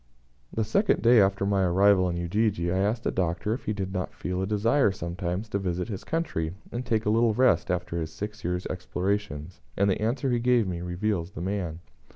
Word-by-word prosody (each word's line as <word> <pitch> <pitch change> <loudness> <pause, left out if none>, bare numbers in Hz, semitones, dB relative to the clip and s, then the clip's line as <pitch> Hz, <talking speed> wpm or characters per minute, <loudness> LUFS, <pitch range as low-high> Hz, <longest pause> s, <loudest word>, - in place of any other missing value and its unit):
The 110 - 0
second 190 - +2
day 120 -1 +7
after 100 0 +2
my 100 -1 +2
arrival 95 +1 +4
in 85 - -2
Ujiji 85 0 0
I 95 - +1
asked 110 +4 0
the - - 0
Doctor 90 +3 -1
if 125 - -6
he - - 0
did 95 -2 -4
not 90 -1 -3
feel 90 0 -3
a 95 - -1
desire, 105 +4 +3
sometimes, 90 +3 -4
to 100 - -1
visit 90 +1 -2
his 100 -4 -5
country, 90 - -2 0.2
and 120 +2 -3
take 115 -2 0
a 105 - +2
little 115 -1 +3
rest 125 -9 +3
after 90 -1 -1
his 80 -1 -4
six 105 +6 -6
years' 90 +1 -2
explorations; 90 -2 -3 0.2
and 100 0 +3
the 95 - -1
answer 125 +4 0
he 120 - +2
gave 120 -3 +3
me 90 -2 -3
fully 90 +1 -5
reveals 95 -2 -1
the - - -6
man. 90 -3 -3
95 Hz, 215 wpm, -27 LUFS, 90-110 Hz, 0.2 s, day